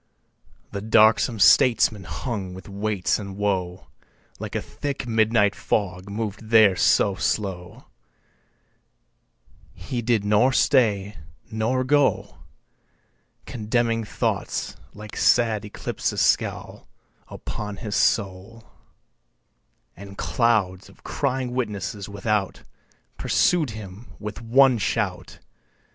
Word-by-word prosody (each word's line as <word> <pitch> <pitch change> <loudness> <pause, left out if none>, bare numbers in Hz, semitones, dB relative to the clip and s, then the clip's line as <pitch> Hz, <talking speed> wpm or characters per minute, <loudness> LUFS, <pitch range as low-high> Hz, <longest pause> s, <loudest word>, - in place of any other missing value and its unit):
2. 100 - -3
The - - -8
darksome 110 +2 +4
statesman 110 -1 +4
hung 100 -8 -5
with 95 - -11
weights 100 -1 -1
and 100 -2 -8
woe 95 -3 -2 0.5
Like - - -6
a - - +1
thick 140 -3 -5
midnight 110 -2 +2
fog 90 -2 -2
mov'd 110 +1 -5
there 110 -4 +6
so 100 +2 +3
slow 95 -2 -3 1.9
He 125 -3 -5
did 115 -3 0
nor 105 +6 +3
stay, 105 -8 +2 0.3
nor 115 +4 0
go; 140 +1 +1 1.1
Condemning 115 0 -1
thoughts 105 - -3 0.2
(like 105 0 -10
sad 110 -4 +2
eclipses) 105 - -4
scowl - - -1 0.4
Upon 105 -1 -6
his 105 0 -5
soul, 100 +2 -1 1.3
And 100 +1 -11
clouds 105 -6 0
of - - -21
crying 130 -3 -2
witnesses 105 -4 -4
without 100 -1 -2 0.6
Pursued 165 -6 +2
him 110 0 -9
with 105 +1 -7
one 125 +1 +4
shout. - - -2
105 Hz, 100 wpm, -23 LUFS, 100-115 Hz, 1.9 s, there